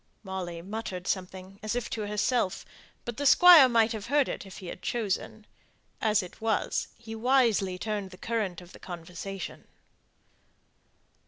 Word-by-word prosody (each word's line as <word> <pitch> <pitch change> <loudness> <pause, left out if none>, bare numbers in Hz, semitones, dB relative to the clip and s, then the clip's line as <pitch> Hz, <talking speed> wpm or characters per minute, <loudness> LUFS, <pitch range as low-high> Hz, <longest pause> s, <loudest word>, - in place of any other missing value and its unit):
Molly 180 -4 -5
muttered 190 -2 -5
something, 190 0 -4
as 215 +1 -2
if 245 -1 -2
to 215 -2 -3
herself, 210 -1 0 0.4
but 240 -1 -5
the 285 - -2
Squire 340 -4 +9
might 230 -1 +3
have 220 -2 -5
heard 285 +1 +3
it - - -5
if 190 - -11
he 190 - -9
had 180 - -7
chosen. 220 -1 -3 0.6
As 215 -2 +3
it 180 - -12
was, 220 -2 0
he 225 -1 -9
wisely 225 -6 +2
turned 205 0 -3
the 185 - -13
current 205 -7 -2
of 175 0 -14
the - - -13
conversation. 180 +2 -7
210 Hz, 155 wpm, -28 LUFS, 185-230 Hz, 0.6 s, Squire